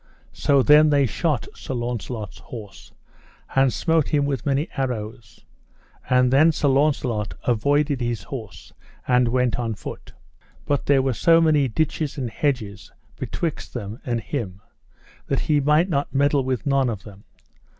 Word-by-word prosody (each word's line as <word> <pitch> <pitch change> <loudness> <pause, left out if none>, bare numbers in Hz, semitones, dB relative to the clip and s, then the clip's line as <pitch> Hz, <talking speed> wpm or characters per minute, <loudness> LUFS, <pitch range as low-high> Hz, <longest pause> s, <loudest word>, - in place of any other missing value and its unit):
So 140 -2 +2
then 150 +2 +6
they 140 -2 +3
shot 145 +1 -1
Sir 135 - -6
Launcelot's 120 -3 -5
horse, 105 -5 -11 0.6
and 135 -1 +4
smote 160 0 +1
him 145 -2 +1
with 140 -2 -3
many 140 +4 +1
arrows; 110 -6 -5 0.6
and 125 0 +3
then 155 +4 +6
Sir 145 -2 0
Launcelot 130 -7 0
avoided 140 +4 +1
his 120 -3 -2
horse, 115 -7 -9 0.3
and 125 -1 +3
went 125 0 +1
on 115 -2 -2
foot; - - -9 0.5
but 145 -1 -1
there 135 -2 +4
were 135 -1 0
so 165 +7 +4
many 155 -4 +3
ditches 150 +4 -2
and 125 -4 -3
hedges 125 -9 -2 0.2
betwixt 165 -5 -4
them 110 0 -5
and 120 -2 -2
him 100 -7 -5 0.7
that - - 0
he 150 -2 +2
might 150 +5 +3
not 145 -6 -1
meddle 140 0 +3
with 130 -3 -2
none 135 -2 +2
of 105 -4 -5
them. 100 -1 -14
135 Hz, 150 wpm, -23 LUFS, 115-145 Hz, 0.7 s, then